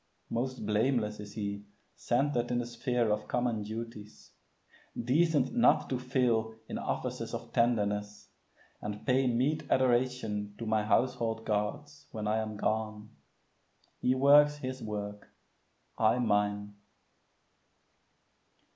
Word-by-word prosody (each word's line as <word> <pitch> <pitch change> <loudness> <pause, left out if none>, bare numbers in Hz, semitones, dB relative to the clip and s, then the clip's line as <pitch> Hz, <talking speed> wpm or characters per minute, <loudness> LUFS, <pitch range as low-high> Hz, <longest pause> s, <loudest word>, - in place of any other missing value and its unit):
Most 125 0 -2
blameless 105 0 +1
is 105 0 -8
he, 100 -2 -3 0.3
centred 120 -1 0
in 120 - 0
the 120 - -1
sphere 120 -1 0
Of 105 0 -1
common 120 -3 0
duties, 110 0 -8 0.7
decent 145 - +2
not 235 - +3
to 130 - 0
fail 125 -3 +1
In - - -4
offices - - -3
of - - -8
tenderness, 105 -3 0 0.5
and 105 0 -6
pay 130 0 +3
Meet 130 +6 0
adoration 120 -5 +1
to 115 - -5
my 110 -1 +1
household 115 0 +1
gods, 145 +8 -3
When 105 -2 -4
I 110 +1 +2
am 110 -1 -4
gone. 110 0 -2 0.9
He 130 - +2
works 145 +2 +6
his 130 -2 -5
work, 105 -2 -5 0.7
I 110 +2 +4
mine. 105 -3 0
115 Hz, 120 wpm, -31 LUFS, 105-125 Hz, 0.9 s, works